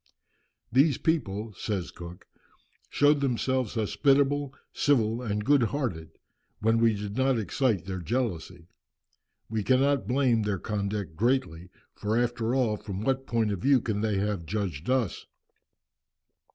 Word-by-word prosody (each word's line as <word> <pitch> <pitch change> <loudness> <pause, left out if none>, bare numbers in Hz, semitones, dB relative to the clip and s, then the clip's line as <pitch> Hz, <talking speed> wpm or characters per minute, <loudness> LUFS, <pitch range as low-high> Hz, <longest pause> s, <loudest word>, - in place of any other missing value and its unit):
"These 135 +3 +4
people," 110 -9 -1
says 95 -2 -3
Cook, 85 0 -10 0.6
"showed 145 0 +3
themselves 130 -2 0
hospitable, 140 +5 +2 0.2
civil, 115 -5 +2
and 105 -3 -2
good 145 0 +4
hearted, 110 - -2 0.5
when 115 +2 +2
we 115 -1 +3
did 100 0 -5
not 130 0 +2
excite 110 -3 0
their 95 -1 -4
jealousy. 90 -5 -3 0.8
We 110 0 -2
cannot 130 0 +2
blame 125 -3 +2
their 105 -2 -1
conduct 100 -3 -3
greatly, 95 -6 0 0.2
for 105 +2 -1
after 120 0 0
all, 115 -5 +1
from 100 -1 -6
what 135 +3 -1
point 115 -3 +1
of 100 - -3
view 135 +6 +4
can 110 -3 -2
they 105 -2 0
have 100 -4 -2
judged 95 - -3
us? 125 -8 0
110 Hz, 135 wpm, -27 LUFS, 100-130 Hz, 0.8 s, These